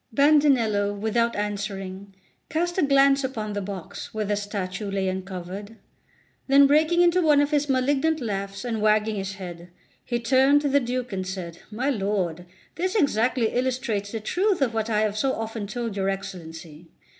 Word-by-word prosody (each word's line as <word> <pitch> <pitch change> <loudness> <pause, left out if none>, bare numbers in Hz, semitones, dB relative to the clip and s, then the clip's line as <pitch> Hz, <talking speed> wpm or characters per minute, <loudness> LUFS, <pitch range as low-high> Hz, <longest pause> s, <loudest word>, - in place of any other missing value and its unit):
Bandinello, 240 -8 +3
without 230 +2 +1
answering, 200 -2 -4 0.3
cast 345 +3 -1
a - - +4
glance 275 -1 +4
upon 220 -5 -3
the 205 - -2
box, 190 -3 -7
where 215 -1 -1
the 205 +1 0
statue 205 -1 -4
lay 195 -1 -1
uncovered. 190 +2 -5 0.7
Then 280 +1 +7
breaking 315 +5 +4
into 350 +1 +4
one 300 -3 +4
of 290 +1 +2
his 295 -1 +1
malignant 280 +4 +1
laughs 200 -3 -4
and 225 -3 -2
wagging 215 0 +2
his 195 0 -4
head, 175 -2 -9 0.3
he 240 - -2
turned 265 +4 +4
to 290 - 0
the 285 +1 +4
Duke 250 -2 -3
and 185 -1 -3
said: 175 -3 -6
"My 250 +6 -1
lord, 190 - -2 0.3
this 370 +4 -1
exactly 250 - +2
illustrates 245 -5 -1
the 225 - -3
truth 375 - 0
of 260 -5 +1
what 220 0 -1
I 215 -1 +2
have 215 -1 0
so 270 +1 +1
often 225 -2 -4
told 230 0 -4
your 195 -1 0
Excellency. 165 -4 -7
220 Hz, 170 wpm, -25 LUFS, 195-275 Hz, 0.7 s, Then